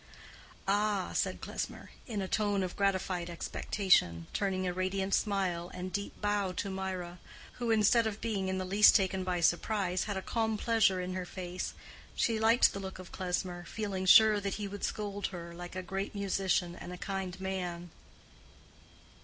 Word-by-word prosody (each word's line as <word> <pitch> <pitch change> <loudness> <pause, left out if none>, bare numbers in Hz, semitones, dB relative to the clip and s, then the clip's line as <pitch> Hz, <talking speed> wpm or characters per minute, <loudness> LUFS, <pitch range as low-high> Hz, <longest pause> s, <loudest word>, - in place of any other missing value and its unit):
"Ah," 205 -1 +1
said - - -1
Klesmer, - - -5 0.2
in 210 -5 -2
a - - -3
tone 205 -1 +1
of 180 - -4
gratified 190 -3 0
expectation, 170 - +1
turning 190 -2 0
a 180 - -1
radiant 190 +1 -1
smile 185 -4 0
and 180 0 -5
deep 200 0 -4
bow 205 -2 0
to 195 +2 -3
Mirah, 185 -2 -4 0.4
who, 240 -1 -1
instead 225 +1 +4
of 215 -1 -4
being 200 -4 -1
in 190 0 -1
the 185 - -2
least 200 +3 +6
taken 190 -2 +2
by 180 -1 -1
surprise, 185 +1 +1
had 205 -2 -3
a 190 - -4
calm 225 -2 0
pleasure 220 -5 +3
in 180 0 -3
her 185 -1 -4
face. 180 -1 -5 0.4
She 225 -2 +1
liked 225 +2 +5
the 200 - -4
look 190 -1 -6
of 185 -1 -11
Klesmer, 180 -1 -3
feeling 195 -3 -3
sure 215 +2 +8
that 200 -1 -2
he 205 -1 -4
would 200 0 -7
scold 205 -1 -2
her, 170 -2 -8
like 175 +1 -8
a 185 - -3
great 195 +3 -4
musician 190 -3 0
and 175 - -8
a 180 - -6
kind 190 -1 -4
man. 180 -3 -4
190 Hz, 175 wpm, -32 LUFS, 180-205 Hz, 0.4 s, sure